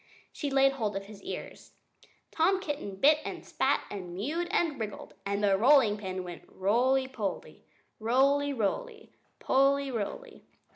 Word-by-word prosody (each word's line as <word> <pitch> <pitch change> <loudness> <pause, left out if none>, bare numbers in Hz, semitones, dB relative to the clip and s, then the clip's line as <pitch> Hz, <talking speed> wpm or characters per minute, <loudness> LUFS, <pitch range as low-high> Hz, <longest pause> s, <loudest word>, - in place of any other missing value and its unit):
She 290 - -4
laid 270 0 +4
hold 220 -7 -2
of 195 0 -4
his 205 -1 -12
ears. - - -8 0.6
Tom 370 +4 +2
Kitten 290 - -5
bit 295 +9 +5
and - - -6
spit, - - +1
and 180 -4 -6
mewed 305 - -2
and 320 -7 0
wriggled; 210 -2 -6
and 200 +1 -1
the 200 -1 +4
rolling 235 0 +5
pin 185 -2 -4
went 175 -1 -8
roly 250 +7 +1
poly, 215 -8 -5 0.3
roly; 275 +5 +2
roly 435 - -3 0.3
poly, 275 +1 +2
roly. - - -5
260 Hz, 145 wpm, -29 LUFS, 205-285 Hz, 0.6 s, bit